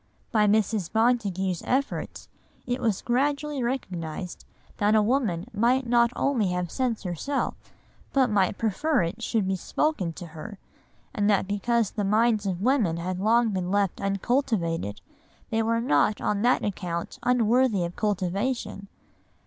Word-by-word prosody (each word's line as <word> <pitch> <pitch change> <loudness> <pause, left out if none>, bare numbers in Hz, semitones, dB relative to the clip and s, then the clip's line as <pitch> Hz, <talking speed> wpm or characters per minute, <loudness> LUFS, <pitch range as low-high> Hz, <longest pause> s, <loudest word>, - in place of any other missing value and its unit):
By 215 -2 +3
Mrs. 210 -3 +1
Montagu's 200 -6 +1
efforts 275 +2 -2 0.4
it 245 +1 -2
was 220 -5 0
gradually 285 +3 0
recognised 180 -9 -4 0.3
that 210 +1 +3
a 215 - +5
woman 210 -8 0
might 245 +5 +2
not 235 0 +3
only 245 -8 +1
have 180 -1 -2
sense 250 -5 -1
herself, 190 - -2 0.6
but 260 -4 +3
might 195 -2 +2
prefer 240 - +1
it 170 - -4
should 215 -4 0
be 190 - +1
spoken 195 - -1
to 175 - -8
her; 205 +6 -8 0.6
and 205 -1 +1
that 195 -2 +2
because 220 +2 0
the 210 - -2
minds 215 +1 +2
of 185 0 -2
women 230 -10 +2
had 180 +2 -3
long 230 +3 +3
been 185 -3 -2
left 200 -1 0
uncultivated 195 - -1 0.5
they 225 - +2
were 230 +1 +1
not 210 - +2
on 205 -1 0
that 245 +3 +3
account 175 -4 -4
unworthy 245 -4 +2
of 170 - -6
cultivation. 205 +1 -2
210 Hz, 145 wpm, -26 LUFS, 185-240 Hz, 0.6 s, a